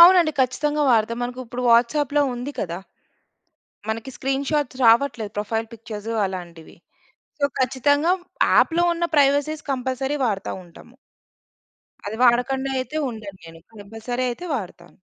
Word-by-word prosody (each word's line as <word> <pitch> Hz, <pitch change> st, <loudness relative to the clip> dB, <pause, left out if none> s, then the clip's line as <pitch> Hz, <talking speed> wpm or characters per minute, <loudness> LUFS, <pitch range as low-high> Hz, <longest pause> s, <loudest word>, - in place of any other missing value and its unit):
అవునండి. 345 Hz, -2 st, +8 dB
ఖచ్చితంగా 295 Hz, +4 st, +1 dB
వాడతాం. 230 Hz, +1 st, +2 dB
మనకు 245 Hz, +1 st, -4 dB
ఇప్పుడు 245 Hz, +2 st, -5 dB
వాట్సాప్‌లో 285 Hz, +5 st, +3 dB
ఉంది 250 Hz, +4 st, -5 dB
కదా! 170 Hz, -1 st, -3 dB, 1.1 s
మనకి 225 Hz, +4 st, -3 dB
స్క్రీన్ 270 Hz, +1 st, -1 dB
షాట్స్ 290 Hz, -4 st, -1 dB
రావట్లేదు, 230 Hz, -2 st, +3 dB
ప్రొఫైల్ 225 Hz, +2 st, -2 dB
పిక్చర్సు 225 Hz, -1 st, -6 dB
అలాంటివి. 175 Hz, -4 st, -8 dB, 0.7 s
సో, -, -, +3 dB, 0.2 s
ఖచ్చితంగా 285 Hz, +6 st, +2 dB, 0.4 s
యాప్‌లో 345 Hz, +1 st, +4 dB
ఉన్న 345 Hz, 0 st, -1 dB
ప్రైవసీస్ 290 Hz, +2 st, +3 dB
కంపల్సరీ 265 Hz, +2 st, -2 dB
వాడతావుంటాము. 195 Hz, +2 st, -5 dB, 1.1 s
అది 215 Hz, -, -4 dB
వాడకుండా 265 Hz, +2 st, +3 dB
అయితే 260 Hz, +4 st, -4 dB
ఉండను 205 Hz, -4 st, -9 dB
నేను. 165 Hz, 0 st, -12 dB
కంపల్సరీ 225 Hz, +4 st, -5 dB
అయితే 350 Hz, +9 st, -6 dB
వాడతాను. 175 Hz, -4 st, -8 dB
245 Hz, 120 wpm, -23 LUFS, 220-285 Hz, 1.1 s, అవునండి